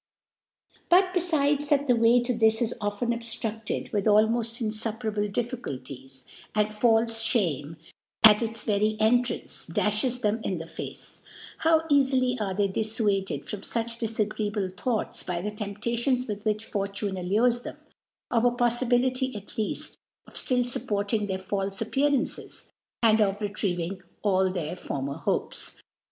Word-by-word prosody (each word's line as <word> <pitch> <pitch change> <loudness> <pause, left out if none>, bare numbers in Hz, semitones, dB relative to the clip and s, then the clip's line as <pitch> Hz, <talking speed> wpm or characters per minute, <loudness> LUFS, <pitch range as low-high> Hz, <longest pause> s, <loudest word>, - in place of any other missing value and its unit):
But 365 +1 +5
befides 295 -5 +1
^th^ 285 -1 +3
the 250 -3 +4
Way 230 +1 +4
to 245 0 -1
this 220 -1 +3
is 235 0 0
often 205 +3 -1
obftru^ed 225 -2 -3
with 205 -2 0
almofl: 225 +1 +2
jii^fupera^le 215 -1 -2
)Dtfficu| 240 - -3
Vies^ 130 0 -12 0.3
wd 210 0 +2
f^ilfeShatne, 225 - +1 0.5
^cits 215 -1 +3
very^Entrance, 245 -5 0
dafhes 215 +7 0
them 215 +2 +1
in 185 - -1
the 165 - -6
Face, - - -8 0.4
how 320 0 +4
easily 260 -3 +3
are 195 -3 -2
they 200 0 +2
diffuaded 200 - -1
from 205 - -5
fuch 230 +2 -3
dilagreeahle 210 -3 -1
Thoi^hcs 220 +3 -2
by 180 -2 -1
the 210 +4 -3
Teippcations 235 +5 -1
with 210 -1 -5
which 215 0 0
Fortune 200 -1 -3
allures 220 +7 +2
them, - - -8 0.5
of 230 -1 +2
a 245 - +6
PoflibiJity, 245 +1 +1
at 205 -1 -7
|eaft, 215 -2 -3 0.3
of - - -17
fiill 250 -1 0
fuppor<tng 210 -3 -1
their 190 -1 -1
faU^e 195 +1 -3
Appearances, 285 0 -1 0.3
and 220 -1 +5
of 200 -1 +2
retrieving 190 -3 -2 0.2
aU 190 -2 +3
tl\eir 175 -2 -3
former 140 +1 -4
Hopes 160 - -3
220 Hz, 135 wpm, -27 LUFS, 200-240 Hz, 0.5 s, a